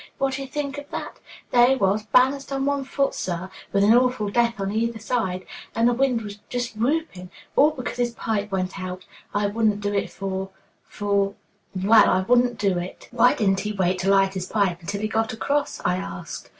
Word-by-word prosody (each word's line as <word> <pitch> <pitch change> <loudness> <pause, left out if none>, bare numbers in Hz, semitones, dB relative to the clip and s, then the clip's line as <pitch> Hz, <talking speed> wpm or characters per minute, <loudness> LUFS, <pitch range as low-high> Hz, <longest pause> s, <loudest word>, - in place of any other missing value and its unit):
Wha'd' 270 0 0
ye 270 - -5
think 285 0 -4
of 285 - -12
that? - - -6 0.3
There 240 0 +6
he 265 - +4
was, 210 -1 +1
balanced 270 +4 +3
on 270 0 -1
one 280 -1 0
foot, 275 +1 0
sir, 185 +1 -4 0.2
with 200 0 +3
an 210 +2 +6
awful 250 -4 +2
death 235 0 +1
on 195 0 -2
either 230 +2 -1
side, 205 -5 -2 0.3
and 230 +1 +3
the 245 - +3
wind 235 -5 -1
just 245 -3 -3
whooping 235 - -1 0.3
all 295 - +6
because 260 -6 -5
his 240 -1 -1
pipe 210 -3 -2
went 185 0 -2
out. 185 0 -6 0.3
I 205 0 +2
wouldn't 210 0 +1
do 205 0 -2
it 200 - 0
for 190 0 -4 0.4
for 200 -1 0 0.4
Well, 205 +3 +5
I 185 - +3
wouldn't 245 +3 +3
do 195 -3 +1
it." 180 +2 -8
"Why 245 0 +4
didn't 195 -3 +2
he 210 +2 -3
wait 185 -2 0
to 190 - 0
light 195 -1 +4
his 185 -1 -4
pipe 190 -5 0
until 200 +4 -4
he 215 - 0
got 220 0 -1
across?" 280 +6 -1
I 180 - +2
asked. 190 - -7
215 Hz, 205 wpm, -24 LUFS, 195-245 Hz, 0.4 s, There